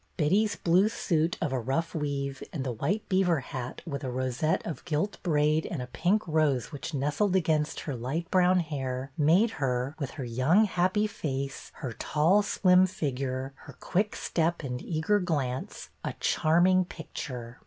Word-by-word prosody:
Betty's 195 Hz, +7 st, +2 dB
blue 180 Hz, +5 st, +3 dB
suit, 165 Hz, -6 st, 0 dB
of 160 Hz, -5 st, 0 dB
a 130 Hz, -, 0 dB
rough 135 Hz, +8 st, -1 dB
weave, 140 Hz, -3 st, -3 dB
and 145 Hz, -6 st, -3 dB
the 130 Hz, -, -2 dB
white 160 Hz, -, -2 dB
beaver 185 Hz, -6 st, +2 dB
hat, 125 Hz, -1 st, -6 dB
with 140 Hz, -5 st, -5 dB
a 130 Hz, -, -2 dB
rosette 130 Hz, +4 st, -1 dB
of 165 Hz, -, -5 dB
gilt 175 Hz, +5 st, -2 dB
braid 155 Hz, -2 st, +2 dB
and 170 Hz, -, -3 dB
a 125 Hz, -, -3 dB
pink 175 Hz, +12 st, 0 dB
rose 150 Hz, -7 st, +1 dB
which 145 Hz, +2 st, -5 dB
nestled 150 Hz, +8 st, +1 dB
against 160 Hz, -4 st, +1 dB
her 145 Hz, -, -4 dB
light 135 Hz, +8 st, -3 dB
brown 185 Hz, -1 st, +4 dB
hair, 135 Hz, -4 st, -4 dB
made 175 Hz, +10 st, +4 dB
her, 130 Hz, +2 st, 0 dB
with 140 Hz, -3 st, -2 dB
her 135 Hz, -, -3 dB
young, 130 Hz, -, +3 dB
happy 185 Hz, +2 st, +1 dB
face, 140 Hz, -9 st, -4 dB, 0.2 s
her 120 Hz, -, -3 dB
tall, 165 Hz, -, +3 dB
slim 185 Hz, -2 st, +4 dB
figure, 135 Hz, -6 st, -3 dB
her -, -, -12 dB
quick 205 Hz, +3 st, 0 dB
step 170 Hz, 0 st, -1 dB
and 125 Hz, -2 st, -4 dB
eager 165 Hz, +5 st, +1 dB
glance, 140 Hz, -8 st, -3 dB
a -, -, -3 dB
charming 180 Hz, +4 st, +3 dB
picture. 125 Hz, -8 st, -7 dB
155 Hz, 165 wpm, -28 LUFS, 135-180 Hz, 0.2 s, brown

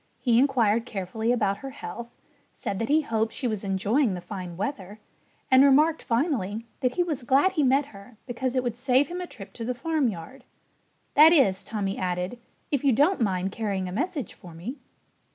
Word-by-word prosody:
He 235 Hz, -3 st, +3 dB
inquired 235 Hz, -4 st, +2 dB
carefully 220 Hz, +3 st, -2 dB
about 205 Hz, -5 st, +1 dB
her 270 Hz, -, -7 dB
health, 235 Hz, -3 st, -8 dB, 0.5 s
said 195 Hz, -, -4 dB
that 230 Hz, -, -2 dB
he 310 Hz, +2 st, +4 dB
hoped 225 Hz, -5 st, -1 dB
she 255 Hz, -, -2 dB
was 215 Hz, -3 st, -2 dB
enjoying 200 Hz, +4 st, +1 dB
the -, -, -5 dB
fine 175 Hz, -1 st, -7 dB
weather, 205 Hz, -1 st, -5 dB, 0.5 s
and 260 Hz, +1 st, +7 dB
remarked 300 Hz, +4 st, +4 dB
finally 230 Hz, -, -1 dB
that 250 Hz, -2 st, 0 dB
he 355 Hz, -, +2 dB
was 310 Hz, -7 st, -3 dB
glad 270 Hz, +9 st, +3 dB
he 340 Hz, -5 st, 0 dB
met 270 Hz, +1 st, +3 dB
her 200 Hz, +3 st, -14 dB
because 250 Hz, +1 st, -3 dB
it 255 Hz, -, +1 dB
would 240 Hz, -2 st, -2 dB
save 260 Hz, +4 st, +2 dB
him 355 Hz, +1 st, -4 dB
a 360 Hz, -, -5 dB
trip 225 Hz, -, -12 dB
to 230 Hz, -, -7 dB
the 250 Hz, +2 st, -2 dB
farmyard. 255 Hz, -, -2 dB, 0.7 s
"That 310 Hz, +2 st, +8 dB
is," 200 Hz, -, +3 dB
Tommy 200 Hz, -3 st, -3 dB
added, 180 Hz, +5 st, -2 dB, 0.3 s
"if 285 Hz, -2 st, 0 dB
you 275 Hz, -, +4 dB
don't 295 Hz, -, +3 dB
mind 190 Hz, -3 st, 0 dB
carrying 200 Hz, -4 st, -2 dB
a -, -, -5 dB
message 290 Hz, -, -3 dB
for 175 Hz, -5 st, -13 dB
me." 235 Hz, -, -7 dB
240 Hz, 190 wpm, -26 LUFS, 200-275 Hz, 0.7 s, That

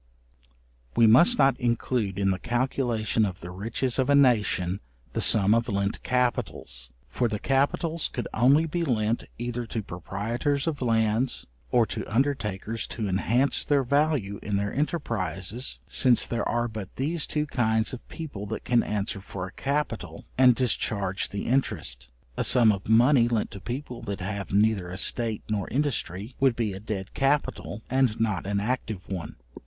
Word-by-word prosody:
We 115 Hz, -, +5 dB
must 170 Hz, -, +6 dB
not 135 Hz, -, +3 dB
include 120 Hz, -4 st, -1 dB
in 100 Hz, -1 st, +2 dB
the 95 Hz, -, -2 dB
calculation 120 Hz, -2 st, 0 dB
of 95 Hz, -4 st, -3 dB
the 90 Hz, -, -7 dB
riches 115 Hz, +7 st, -1 dB
of 130 Hz, +1 st, +1 dB
a 140 Hz, -, +5 dB
nation 105 Hz, -8 st, +3 dB, 0.3 s
the -, -, -1 dB
sum 105 Hz, -1 st, +6 dB
of 115 Hz, +1 st, +1 dB
lent 100 Hz, 0 st, -1 dB
capitals; 115 Hz, -, -1 dB, 0.2 s
for 125 Hz, -, 0 dB
the 110 Hz, -2 st, -2 dB
capitals 145 Hz, -, 0 dB
could 120 Hz, -, -5 dB
only 135 Hz, +8 st, +4 dB
be 170 Hz, +2 st, -2 dB
lent 115 Hz, -5 st, 0 dB
either 120 Hz, 0 st, -4 dB
to 110 Hz, -1 st, -3 dB
proprietors 115 Hz, -, -2 dB
of 160 Hz, -4 st, -2 dB
lands, 115 Hz, +1 st, +1 dB, 0.2 s
or 120 Hz, -2 st, +4 dB
to -, -, -4 dB
undertakers 115 Hz, -4 st, -1 dB
to 110 Hz, -3 st, -4 dB
enhance 115 Hz, +8 st, +1 dB
their 140 Hz, -2 st, +2 dB
value 140 Hz, -7 st, +1 dB
in 105 Hz, -, -2 dB
their 100 Hz, +1 st, -1 dB
enterprizes, 120 Hz, -, -2 dB
since 125 Hz, -3 st, +4 dB
there 120 Hz, -1 st, -2 dB
are 120 Hz, 0 st, 0 dB
but 110 Hz, -4 st, -7 dB
these 150 Hz, +4 st, -1 dB
two 150 Hz, 0 st, -1 dB
kinds 110 Hz, -5 st, 0 dB
of 125 Hz, -, -9 dB
people 140 Hz, -, -7 dB
that 110 Hz, -, -5 dB
can 120 Hz, -1 st, +3 dB
answer 105 Hz, -1 st, -2 dB
for 95 Hz, -1 st, -6 dB
a 95 Hz, -, -9 dB
capital, 145 Hz, +2 st, -3 dB
and 125 Hz, -2 st, +6 dB
discharge 100 Hz, -5 st, 0 dB
the 100 Hz, -, -4 dB
interest: 65 Hz, -, -1 dB, 0.3 s
a -, -, +1 dB
sum 120 Hz, -4 st, +5 dB
of 100 Hz, 0 st, -4 dB
money 120 Hz, +2 st, +5 dB
lent 115 Hz, -3 st, -1 dB
to 100 Hz, -, -9 dB
people 125 Hz, +1 st, -5 dB
that 100 Hz, -3 st, -5 dB
have 100 Hz, +1 st, -4 dB
neither 100 Hz, -2 st, +2 dB
estate 110 Hz, +4 st, -1 dB
nor 105 Hz, -3 st, -2 dB
industry, 125 Hz, -, -2 dB
would 130 Hz, -3 st, +3 dB
be 110 Hz, -4 st, -1 dB
a 95 Hz, -, -7 dB
dead 100 Hz, -2 st, -5 dB
capital, 135 Hz, -6 st, -1 dB
and 130 Hz, -4 st, +1 dB
not 105 Hz, -5 st, -1 dB
an 100 Hz, 0 st, 0 dB
active 110 Hz, -3 st, -3 dB
one. 90 Hz, -6 st, -5 dB
115 Hz, 165 wpm, -26 LUFS, 100-130 Hz, 0.3 s, must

